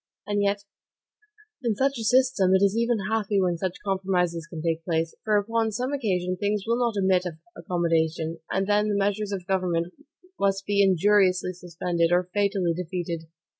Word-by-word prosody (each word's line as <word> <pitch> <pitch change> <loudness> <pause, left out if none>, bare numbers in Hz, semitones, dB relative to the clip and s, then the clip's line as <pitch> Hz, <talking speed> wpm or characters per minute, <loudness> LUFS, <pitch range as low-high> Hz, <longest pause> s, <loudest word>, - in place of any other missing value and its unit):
And 205 0 0
yet, 200 0 0 1.0
in 235 -4 0
such 270 +2 0
a - - -3
system, 235 -5 +3
it 190 - +3
is 200 +1 +3
even 235 0 +1
happy 210 -2 +1
when 175 -3 0
such 185 0 -2
compromises 180 -4 0
can 160 -2 -7
take 165 -1 -1
place: 165 -1 -1
for 215 -1 +2
upon 225 +2 0
some 250 +5 -2
occasions 185 -8 -1
things 205 0 0
will 230 +1 +1
not 235 -3 +1
admit 190 -2 +2
of 165 -3 -7 0.2
accommodation; 165 -1 -1
and 195 0 0
then 210 +1 +2
the 205 - +1
measures 205 +1 0
of 190 -3 -4
government 180 -2 -1 0.5
must 195 -1 +1
be 200 0 +2
injuriously 190 -1 +3
suspended, 175 -1 -1
or 180 0 +2
fatally 200 -4 +1
defeated. 170 -1 -4
190 Hz, 170 wpm, -25 LUFS, 175-205 Hz, 1.0 s, system